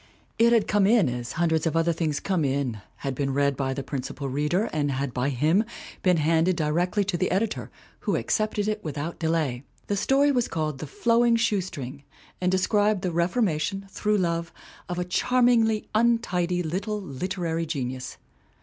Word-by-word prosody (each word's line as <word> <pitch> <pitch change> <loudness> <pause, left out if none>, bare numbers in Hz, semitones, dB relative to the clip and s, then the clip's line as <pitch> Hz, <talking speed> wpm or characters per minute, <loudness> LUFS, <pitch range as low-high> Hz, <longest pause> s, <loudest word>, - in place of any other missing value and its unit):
It 230 +1 +6
had 230 -3 +3
come 205 -2 +3
in 215 - +4
as 125 0 -4
hundreds 160 -1 +1
of 165 - 0
other 165 +1 +2
things 155 -3 -1
come 185 -5 0
in, 135 -6 -1 0.2
had 135 - 0
been 135 0 -2
read 140 0 +2
by 135 -1 -2
the 140 - -4
principal 135 +1 -4
reader 150 +8 +1
and 145 -2 0
had 135 -1 -2
by 125 +2 0
him 155 - +2 0.4
been 180 -3 +3
handed 165 +3 +2
directly 175 +6 +1
to 190 -2 -1
the 185 - 0
editor, 210 +3 -1 0.3
who - - -1
accepted 215 -1 0
it 215 0 -2
with 150 -2 -5
out 155 +4 -4
delay. 160 -6 0 0.2
The 205 - -1
story 275 +8 +3
was 245 -3 +1
called 155 -4 -2
The 155 - -5
Flowing 235 - +3
Shoe 215 -3 +2
String 140 -6 -7 0.4
and 180 0 +2
described 205 +1 +2
the 180 - 0
reformation, 185 +1 0
through 210 +1 +1
love, 170 -2 -1 0.4
of 175 - -3
a 180 - -1
charmingly 230 +2 +2
untidy 200 -6 +1
little 195 +6 -2
literary 165 0 -3
genius. 130 -4 -4
170 Hz, 175 wpm, -26 LUFS, 145-205 Hz, 0.4 s, It